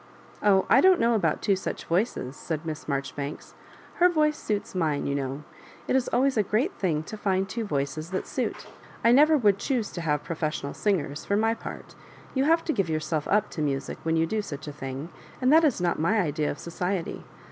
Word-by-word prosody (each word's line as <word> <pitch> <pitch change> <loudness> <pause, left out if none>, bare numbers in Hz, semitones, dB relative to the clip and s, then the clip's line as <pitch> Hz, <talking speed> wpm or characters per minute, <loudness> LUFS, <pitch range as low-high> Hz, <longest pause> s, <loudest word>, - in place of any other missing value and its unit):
"Oh, 195 -2 +4
I - - +6
don*t 375 0 +6
know 235 +1 +3
about 170 -9 +1
two 200 - +3
such 190 - -5
voices,'* 170 - -1
caid 160 0 -2
Miss 155 -2 -5
Marjoribanks; 140 0 -4 0.4
her 360 +1 +6
voice 305 -3 +2
suits 210 -7 -3
mine, 160 -6 0
you 140 - -1
know. 140 +1 -3 0.4
It - - +1
is 260 -2 +2
always 265 0 +2
a - - +5
great 235 - 0
thuig 160 -5 0
to 215 - -7
find 195 -2 0
two 230 +3 -3
voices 150 -1 -2
that 190 0 -3
suit - - -3 0.4
I 230 - +6
never 300 +5 +6
would 205 -6 +3
choose 245 -6 -1
to 175 - -5
have 150 -3 0
professional 155 -3 -3
singers^ 155 -8 -1
for 200 - 0
my 225 +1 +2
part 225 - -8 0.4
You 270 0 +1
have 330 +2 +3
to 320 - 0
give 195 - 0
yourself 155 -1 -1
up 210 0 +2
to 155 - -4
music 140 -2 -2
when 160 0 0
you 165 0 +3
do 215 +6 -1
such 155 -6 -7
a 150 - -5
thing, 135 +2 -6 0.3
and 255 +2 +3
that 325 +1 +7
is 290 -10 +2
not 175 -1 0
my 195 +8 +2
idea 155 -4 0
of - - -4
society. 180 +1 -3
185 Hz, 210 wpm, -27 LUFS, 155-225 Hz, 0.4 s, that